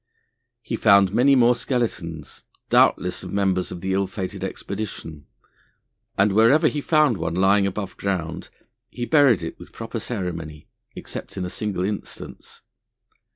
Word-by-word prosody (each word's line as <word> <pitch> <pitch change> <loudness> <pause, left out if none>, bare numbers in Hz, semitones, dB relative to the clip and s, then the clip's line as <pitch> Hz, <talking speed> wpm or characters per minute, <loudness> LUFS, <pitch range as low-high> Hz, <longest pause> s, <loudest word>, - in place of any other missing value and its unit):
He - - -3
found 100 -3 +5
many 130 +5 +5
more 125 -1 +5
skeletons, 105 - -3 0.3
doubtless - - +3
of - - -8
members 95 -2 0
of 85 - -7
the 95 +1 -1
ill 95 0 +1
fated 95 -1 -5
expedition, 95 -7 -6 0.9
and 100 +1 +4
wherever 115 +9 +5
he 145 - -3
found 150 - +3
one 85 0 -3
lying 100 +2 +3
above 100 0 -5
ground 85 -5 -3 0.4
he 120 -1 -5
buried 135 - +4
it 80 - -6
with - - -12
proper 115 0 -6
ceremony, 85 -9 -5 0.3
except - - -7
in 90 - -2
a 90 - -5
single 100 -4 -2
instance. 105 0 -7
100 Hz, 145 wpm, -23 LUFS, 90-115 Hz, 0.9 s, found